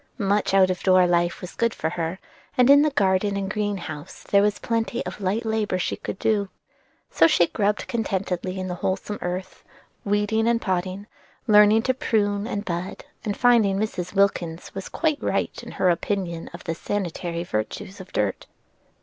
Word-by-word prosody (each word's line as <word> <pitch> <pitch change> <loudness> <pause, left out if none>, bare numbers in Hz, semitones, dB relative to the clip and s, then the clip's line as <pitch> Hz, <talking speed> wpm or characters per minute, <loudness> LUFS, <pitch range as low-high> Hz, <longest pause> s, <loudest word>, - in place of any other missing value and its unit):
Much 205 -2 +1
out 190 -1 +5
of 180 - -4
door 185 -1 +5
life 175 0 +1
was 180 - -8
good 230 -1 0
for 160 - -2
her, 170 +1 -3 0.4
and 250 +2 +6
in 285 +1 +8
garden 200 +1 +2
and 195 0 -2
green 205 -1 -1
house 155 -4 -8
there 200 - +3
was 205 0 +2
plenty 230 -1 -2
of 185 +3 -7
light 205 +5 -1
labor 220 -4 0
she 180 - -1
could - - -6
do. 205 -2 +1 0.6
So - - +5
she 305 - +4
grubbed 205 +4 -1
contentedly 190 -4 -2
in 185 - -3
the 180 - -3
wholesome 195 +2 -2
earth, 180 +1 -5 0.4
weeding 210 +2 +1
and 235 0 +3
potting, 185 0 -2 0.4
learning 210 0 +6
to 260 - +2
prune 205 -4 0
and 205 -3 -3
bud, 175 +1 -4 0.2
and 205 -2 -2
finding 230 -6 +4
Mrs. 190 -4 -3
Wilkins 180 -4 0
was 195 -1 -6
quite 310 -3 0
right - - -1
in - - -10
her 185 - +3
opinion 170 -1 -2
of 170 - -10
the 165 - -2
sanitary 170 -2 -3
virtues 175 - -4
of 190 - -13
dirt. 105 -2 -1
195 Hz, 175 wpm, -24 LUFS, 180-210 Hz, 0.6 s, in